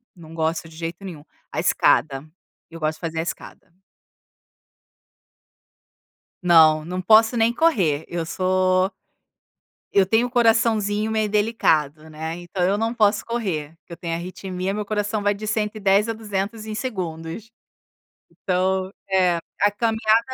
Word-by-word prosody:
não 165 -2 -13
gosto 160 0 -2
de 160 - -15
jeito 165 +3 -6
nenhum, 160 -6 -8 0.3
a - - -3
escada, 135 +2 +2 0.4
eu 165 0 -10
gosto 155 0 -1
de - - -27
fazer 165 -1 -3
a - - +2
escada. 170 +2 -8 2.7
Não, 160 -3 +5
não 180 +3 -4
posso 220 +4 +5
nem 230 +1 +3
correr 190 - +1
eu 170 -1 -3
sou 185 +1 +1 1.0
eu 195 -1 +4
tenho 225 +5 +2
um - - -10
coraçãozinho 225 -3 +2
meio 220 -1 0
delicado, 160 -8 +1
né, 160 +1 -5
então 175 +1 -6
eu 195 +3 +2
não 225 +2 -1
posso 215 -2 +2
correr, 170 -10 -3
que 170 - -11
eu - - -9
tenho 170 -1 -4
arritmia 185 +2 -4
meu 210 0 -3
coração 210 0 -2
vai 205 - +2
de 215 +1 -7
110 210 -1 +1
a - - 0
200 215 0 -4
em 215 -1 -5
segundos, 185 -3 -5 0.8
então, 185 0 -1 0.2
eh, 180 -2 +3 0.2
a 205 - +4
caminhada, 220 +1 +2
190 Hz, 145 wpm, -22 LUFS, 165-215 Hz, 2.7 s, Não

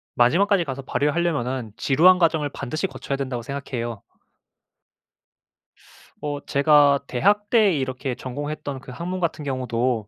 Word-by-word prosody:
마지막까지 175 +10 +3
가서 135 -3 -5
발휘를 145 +2 0
하려면은 130 -9 -1
지루한 170 +7 +5
과정을 160 -4 +2
반드시 155 +7 -3
거쳐야 140 - -5
된다고 130 -3 -3
생각해요. 120 -4 -5 2.2
어 145 -1 -3
제가 145 0 +4
대학 205 +10 +1
때 215 -4 +4
이렇게 130 -2 -3
전공했던 145 +2 -5
그 130 - -11
학문 175 +7 -4
같은 165 -3 -2
경우도 125 -4 -1
140 Hz, 320 characters per minute, -23 LUFS, 130-165 Hz, 2.2 s, 지루한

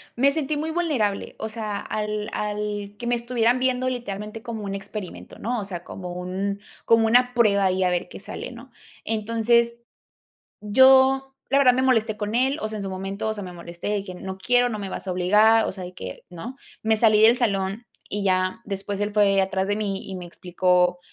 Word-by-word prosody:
me 275 +3 +4
sentí 300 0 -1
muy 310 +2 -2
vulnerable, 285 -13 -1
o 220 - -3
sea, 215 -2 -4
al 210 0 -3
al 210 -1 -3
que 240 - -5
me 240 - +2
estuvieran 240 0 +1
viendo 255 0 +1
literalmente 215 -3 -5
como 230 -3 -5
un 195 -1 -3
experimento, 195 -1 -8
¿no? 240 +2 -2
O 205 - -4
sea, 175 -3 -6
como 180 -1 -7
un 190 +3 -3 0.3
como 225 -1 +4
una 245 +2 +4
prueba 205 -5 +3
ahí 185 0 +2
a 180 - +3
ver 175 -1 -1
qué - - -9
sale, - - -7
¿no? - - -12 0.3
Entonces, 230 +2 +2 0.9
yo, 265 +4 +5
la 275 - +3
verdad, 255 -3 +6
me 255 - +1
molesté 225 -4 +2
con 210 0 -4
él, 265 +4 +2
o 215 - -2
sea, 215 - -5
en 205 - -5
su 195 - -4
momento, 195 +3 -4
o 220 - 0
sea, 205 -2 -6
me 180 - -7
molesté 170 +2 -7
de 205 -1 -1
que 185 -2 -8
no 190 +1 -6
quiero, 245 +4 +2
no 215 -3 -4
me 195 -1 -5
vas 190 - -6
a 185 - -1
obligar, 210 +5 +4
o - - -2
sea, 190 - -8
de 180 0 -8
que, 95 - -8
no, 180 +9 -8 0.3
me 220 0 +3
salí 215 -1 +4
del 225 +2 +7
salón 200 -1 -1 0.2
y 205 0 -3
ya 185 +3 +1
después, 200 -1 -4
él 205 0 -1
fue 200 -2 +4
atrás 190 0 -1
de 205 - +1
mí 200 -2 -3
y 190 - -5
me 180 -1 -7
explicó, 180 0 +1
210 Hz, 215 wpm, -24 LUFS, 195-235 Hz, 0.9 s, del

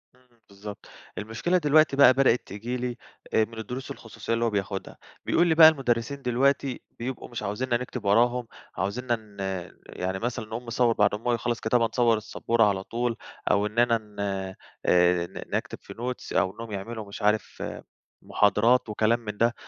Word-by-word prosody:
امم، 125 -2 -30
بالضبط، 100 +1 -9 0.3
المشكلة 115 +12 0
دلوقتي 155 -2 +4
بقى 135 -2 +8
بدأت 130 -2 +2
تيجي 115 +6 -4
لي، 125 -1 -3 0.4
آآ 110 - +4
من 115 +1 -13
الدروس 125 +4 -6
الخصوصيَّة 115 0 -5
اللي 115 0 +1
هو - - +2
بياخُدها، 100 -2 -4 0.3
بيقول 175 +1 +3
لي 160 - +3
بقى: 160 -1 +10
"المدرِّسين 135 -2 -1
دلوقتي 135 +1 +1 0.2
بيبقوا 125 +2 -5
مش 120 -2 -5
عايزينّا 120 +5 -1
نكتُب 125 -2 -6
وراهُم، 120 +4 +3 0.3
عايزينّا 120 +6 -1
ن 105 -3 -16 0.5
يعني 95 +1 -4
مثلًا 120 -1 -3
نقوم 115 +3 -6
نصوِّر 115 0 +2
بعد 105 -2 +2
ما 105 - -8
هو 120 - +3
يخلَّص 120 0 -1
كتابة، 115 +1 +2
نصوِّر 115 -1 +2
السبورة 115 +1 0
على 100 -2 +1
طول، 120 +2 -2 0.4
أو 100 0 +3
إننا 115 +2 +2
ن 105 -2 -15
آآ 95 -2 -3 0.7
ن - - -7
نكتب - - -3
في - - -10
notes." 125 +2 -5
أو 95 - +2
إنّهُم 115 -1 -8
يعمَلوا 110 +2 -5
مش 100 - -9
عارِف 105 0 0 0.6
محاضرات 110 +4 +3
وكلام 110 +2 +2
من 105 -3 -7
ده. 115 +2 +3
115 Hz, 175 wpm, -26 LUFS, 105-125 Hz, 0.7 s, بقى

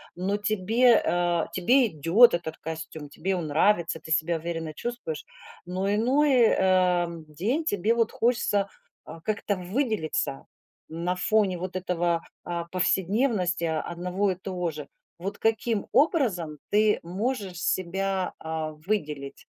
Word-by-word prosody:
Но 190 +3 -1
тебе, 215 +4 +3
э, 175 -1 +1
тебе 245 +8 +4
идет 175 - +5
этот 170 -2 -3
костюм, 160 -1 -7
тебе 185 +6 -2
он 170 -3 -3
нравится, 165 +2 +2
ты 160 - -9
себя 165 +1 +2
уверенно 165 -1 -4
чувствуешь, 235 -5 -5 0.4
но 185 +2 -2
иной, 265 +7 +3 0.2
э, 185 -3 +3 0.2
день 210 - -1
тебе 210 - +1
вот 230 -2 +1
хочется, 225 -4 +1 0.4
а 165 - -10
как-то 205 +2 -1
выделиться 185 - -2 0.4
на 170 +3 -2
фоне 195 0 +2
вот 185 +1 -5
этого, 175 -2 0 0.2
а, 170 -1 -3
повседневности 185 +2 +1
одного 175 +4 -1
и - - -2
того 180 -2 -3
же. 150 -2 -8 0.3
Вот 190 +4 -5
каким 225 -1 0
образом 210 - +2
ты 210 0 +3
можешь 195 +2 -3
себя, 190 +1 -1
а, 160 -1 -3
выделить? 150 -9 -3
185 Hz, 130 wpm, -26 LUFS, 170-215 Hz, 0.4 s, идет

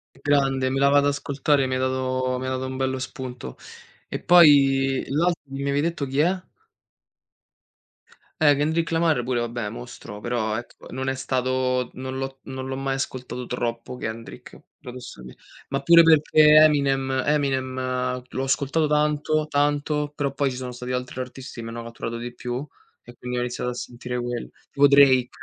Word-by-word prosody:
G - - -20
grande, 135 -2 +2
me 135 +1 -1
la 140 - +5
vado 145 0 +4
ad 145 - +3
ascoltare, 140 0 0
mi 130 - -1
hai 130 - -1
dato 130 0 -1
mi 130 - -4
hai - - -2
dato 130 0 -2
un 130 0 -5
bello 130 0 -1
spunto. 125 - -7 0.5
E - - -4
poi 135 -6 +5
l'altro 170 +5 0
che 140 - -30
mi 140 - -4
avevi 140 0 0
detto 165 -3 -2
chi 135 +2 -1
è? 180 +4 +2 2.0
Eh, 145 -2 +6
Kendrick 160 +3 0
Lamar 165 -5 +2
pure, 120 0 -1
vabbè, 120 -2 -3
mostro, 120 -2 -9
però 110 -2 -1
ecco 120 +1 -10
non 130 +1 -2
è - - -1
stato 130 -1 -1
non 130 0 -6
l'ho 135 0 -5
non 130 -1 -6
l'ho 135 - -3
mai 135 0 -2
ascoltato 125 -2 -5
troppo 120 0 -4
Kendrick, 115 0 -8 0.2
paradossal 125 - -10 0.4
ma 135 0 -2
pure 170 +4 +8
perché 155 -1 +6
Eminem 135 -3 +2
Eminem 130 -3 -1
l'ho 130 - -4
ascoltato 140 +3 +1
tanto 150 +1 +1
tanto, 145 0 0
però 140 -2 -1
poi 140 0 0
ci 125 - -6
sono 125 -1 -5
stati 125 +1 -6
altri 125 0 -4
artisti 125 -1 -8
che 115 - -7
m' - - -5
hanno 115 +1 -6
catturato 115 0 -6
di 120 +1 -6
più 125 +3 -5 0.4
e 120 - -14
quindi 125 +1 -5
ho - - 0
iniziato 125 0 -3
a - - -8
sentire 125 0 -6
quelli. 120 0 -4 0.2
Tipo 145 0 +4
Drake, 135 -3 +6
130 Hz, 180 wpm, -24 LUFS, 125-145 Hz, 2.0 s, pure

